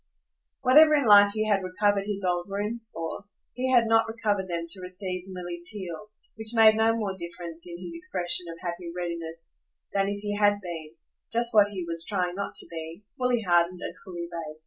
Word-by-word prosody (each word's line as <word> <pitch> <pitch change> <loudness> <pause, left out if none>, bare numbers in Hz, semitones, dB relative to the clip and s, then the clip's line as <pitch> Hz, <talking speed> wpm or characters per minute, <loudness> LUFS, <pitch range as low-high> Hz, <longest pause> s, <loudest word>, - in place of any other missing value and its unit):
Whatever 300 +4 +7
in 285 -3 +2
life 205 -1 +7
he 215 0 0
had 200 -2 +2
recovered 200 +2 0
his 200 -2 -3
old 175 0 -1
rooms 215 +3 -3
for, 165 +4 -6 0.3
he 260 +1 -1
had 240 -2 +5
not 225 0 +3
recovered 210 -4 -1
them 170 -1 -2
to 185 +2 -6
receive 185 0 -5
Milly 175 -2 -6
Theale: 195 +1 -4 0.3
which 220 +1 -1
made 220 -1 +7
no 225 +1 +3
more 200 -4 -2
difference 170 -1 -7
in 170 -1 -7
his 175 -1 -8
expression 175 +1 0
of 165 - -9
happy 175 -1 -5
readiness 165 -1 -5 0.4
than 195 0 +1
if 200 0 -4
he 205 0 -3
had 205 0 +3
been 165 -4 -8 0.4
just 235 +1 +4
what 205 -2 +6
he 190 -4 -5
was 165 0 0
trying 180 -2 -1
not 195 +1 -5
to - - +2
be 165 +3 -7
fully 250 -2 0
hardened 175 0 +2
and - - -4
fully 175 -3 -6
base. 160 -3 -7
190 Hz, 195 wpm, -27 LUFS, 175-210 Hz, 0.4 s, Whatever